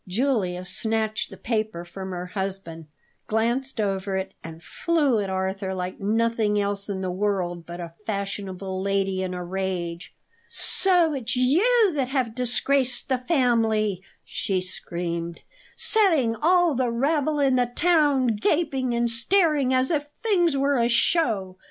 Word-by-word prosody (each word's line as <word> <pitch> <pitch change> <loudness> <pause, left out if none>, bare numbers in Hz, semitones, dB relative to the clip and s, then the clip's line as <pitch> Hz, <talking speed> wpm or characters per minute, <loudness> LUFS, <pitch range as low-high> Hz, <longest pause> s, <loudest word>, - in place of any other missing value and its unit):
Julia 190 -4 0
snatched 220 +2 -1
the - - -11
paper 215 -6 -2
from 190 +2 -7
her 180 -1 -4
husband, 185 -4 -5 0.4
glanced 240 +4 0
over 195 -1 -1
it, 190 0 -4
and 165 0 -10
flew 295 -9 +1
at 200 -2 -2
Arthur 190 0 -2
like 180 0 -4
nothing 220 0 +1
else 200 0 -2
in 190 -1 -3
the 185 -1 -2
world 180 -3 -2
but 175 +1 -7
a 170 -1 -7
fashionable 195 -2 -4
lady 195 -1 0
in 185 -1 -3
a 180 - -4
rage. 180 -2 -4 0.3
"So 355 -5 +2
it's 255 -4 -3
you 385 - +4
that 275 -4 0
have 255 -4 -1
disgraced 250 +2 0
the 260 -1 +1
family!" 225 - +1 0.2
she 190 -2 -1
screamed; 170 -2 -5 0.4
"setting 325 - +3
all 350 +4 +3
the 255 -1 0
rabble 290 +5 0
in 270 -2 +3
the 250 -1 +2
town 295 -7 +3
gaping 265 -1 0
and 235 0 +1
staring 285 +3 +2
as 260 +2 +2
if 295 -2 0 0.2
the 455 - -2
thing 345 -8 +3
were 280 0 +2
a 235 0 +2
show? 225 - +1
220 Hz, 150 wpm, -25 LUFS, 190-270 Hz, 0.4 s, you